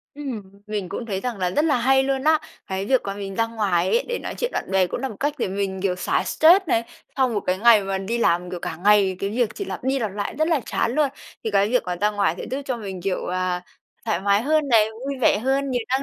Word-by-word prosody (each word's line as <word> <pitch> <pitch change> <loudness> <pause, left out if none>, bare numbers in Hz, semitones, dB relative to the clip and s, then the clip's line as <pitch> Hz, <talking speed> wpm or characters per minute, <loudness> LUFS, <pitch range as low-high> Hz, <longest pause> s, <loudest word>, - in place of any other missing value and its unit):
Ừm, 285 -3 -5 0.3
mình 210 -3 -3
cũng 230 - -5
thấy 195 -4 -2
rằng 240 -1 -4
là 180 -1 0
rất 295 +10 +1
là 305 -4 +3
hay 265 +2 +3
luôn 270 0 -1
á. 315 0 +5 0.3
Cái 190 0 -3
việc 260 +2 +3
mà 195 - -3
mình 200 -1 -6
ra 230 +3 +1
ngoài 200 -6 0
ấy 485 - +3
để 480 - -1
nói - - -5
chuyện 485 - -1
bạn - - -3
bè 190 -1 +3
cũng 180 - -4
là 265 - -2
một 220 - -9
cách 290 +1 0
để - - -1
mình, 190 0 -3
kiểu, 190 -2 +1
xả 180 - 0
stress 350 +5 +5
này, 230 -6 +1 0.3
sau 265 -2 +3
một 220 -4 -1
cái 185 -1 -1
ngày 225 -1 +6
mà 195 0 -2
đi 195 +5 -2
làm, 180 -5 +1
kiểu, 180 -1 -5
cả 160 - -4
ngày 195 +1 +3
cái 195 - -2
việc 235 +1 +1
chỉ 400 - -4
lặp 370 - -6
đi 265 +1 +1
lặp 220 -5 -2
lại 205 0 -4
rất 315 +1 +2
là 320 -5 +2
chán 235 - -1
luôn, 300 -1 +3 0.4
thì 220 - -1
cái 200 0 +3
việc 250 +2 +2
mà 180 0 -2
ra 210 +1 +3
ngoài 200 -5 +1
sẽ - - -5
giúp 270 +2 -3
cho 260 -2 -2
mình, 195 -5 -7
kiểu, 190 0 -2
à, 180 0 -1 0.4
thoải 170 - 0
mái 200 +2 +2
hơn 305 +2 +1
này, 225 -4 +5
vui 265 +5 -6
vẻ 220 - +4
hơn, 270 +4 0
nhiều 245 -2 0
năng 260 +2 +1
220 Hz, 280 wpm, -23 LUFS, 195-265 Hz, 0.4 s, ngày